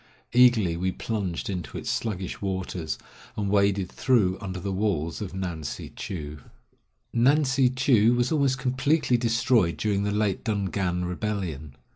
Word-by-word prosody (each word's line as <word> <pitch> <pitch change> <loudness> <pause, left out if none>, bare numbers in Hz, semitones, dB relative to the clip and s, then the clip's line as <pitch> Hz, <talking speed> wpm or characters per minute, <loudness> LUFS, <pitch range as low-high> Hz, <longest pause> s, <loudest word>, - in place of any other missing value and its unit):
Eagerly 120 -8 +5
we 90 +2 -1
plunged 100 -5 -3
into 90 -4 -4
its - - -7
sluggish 95 -5 -3
waters, 95 -4 -3 0.4
and 100 -2 -1
waded 100 -2 +2
through 105 -8 +2
under 95 -2 -5
the 100 +2 -3
walls 95 -5 -1
of 95 -3 -5
Ngan 90 -4 -4
si - - -6
chou. 75 -5 -6 0.8
Ngan 140 +6 +4
si 130 -1 +3
chou 125 -3 +3
was 120 +3 +1
almost 140 -4 +2
completely 130 +2 +1
destroyed 115 -5 +2
during 100 -2 0
the 100 - 0
late 105 -2 0
Dungan 95 -4 -1
rebellion. 90 -7 -4
100 Hz, 145 wpm, -26 LUFS, 90-120 Hz, 0.8 s, Eagerly